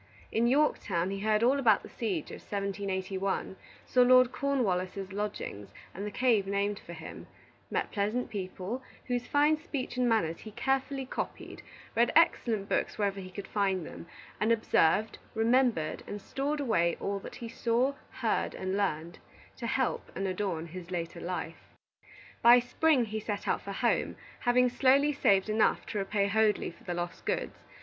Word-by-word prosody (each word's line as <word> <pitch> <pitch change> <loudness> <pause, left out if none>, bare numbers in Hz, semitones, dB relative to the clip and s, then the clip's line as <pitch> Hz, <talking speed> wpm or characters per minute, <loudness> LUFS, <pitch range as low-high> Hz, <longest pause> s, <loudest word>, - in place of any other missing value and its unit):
In 230 +2 +2
Yorktown, 210 - +1
he 195 - -3
heard 215 +2 +2
all 265 +4 +4
about 220 -6 +4
the - - -9
siege 195 -10 -3
of - - -8
1781; 195 -1 -2 0.3
saw 250 - +3
Lord 255 0 +6
Cornwallis's 195 -8 -1
lodgings 205 - -5 0.2
and 200 +3 -5
the - - -2
cave 220 -3 +2
named 200 +1 0
for 170 - -10
him; 160 -1 -9 0.4
met - - -1
pleasant 215 +5 -1
people, 195 +4 -4 0.2
whose 245 -1 -2
fine 295 +2 +3
speech 280 -5 -5
and 250 -1 +2
manners 165 -8 +1
he 220 - -9
carefully 270 +3 -1
copied; - - -5 0.3
read 235 +1 +3
excellent 230 -10 +3
books - - -1
wherever 200 -2 0
he 185 -1 -7
could 195 +1 -7
find 195 -4 0
them, 170 - -9 0.3
and 215 +2 +2
observed, 220 -2 +2 0.2
remembered, 225 -8 +2
and 205 - -5
stored 280 +8 -2
away 170 -11 +1
all 200 0 -2
that - - -9
he 235 - -7
saw, 245 +3 +1 0.2
heard, - - -1
and 185 0 -2
learned, 170 -4 -2 0.4
to 235 - -5
help 260 +1 -1
and 195 - -1
adorn 185 -3 -2
his 175 +1 -9
later 170 -2 -4
life. 170 -2 -6 0.7
By 240 +1 +9
spring 255 +2 +2
he 215 0 -4
set 210 -1 -4
out - - +1
for 200 - -6
home, 235 +4 0 0.2
having 250 +1 +4
slowly 270 +4 +4
saved 200 -8 +3
enough 215 0 +2
to 210 - -3
repay 200 +1 0
Hoadley 215 -1 +2
for - - -20
the 175 - -3
lost 175 0 -4
goods. - - -2
210 Hz, 165 wpm, -30 LUFS, 190-245 Hz, 0.7 s, By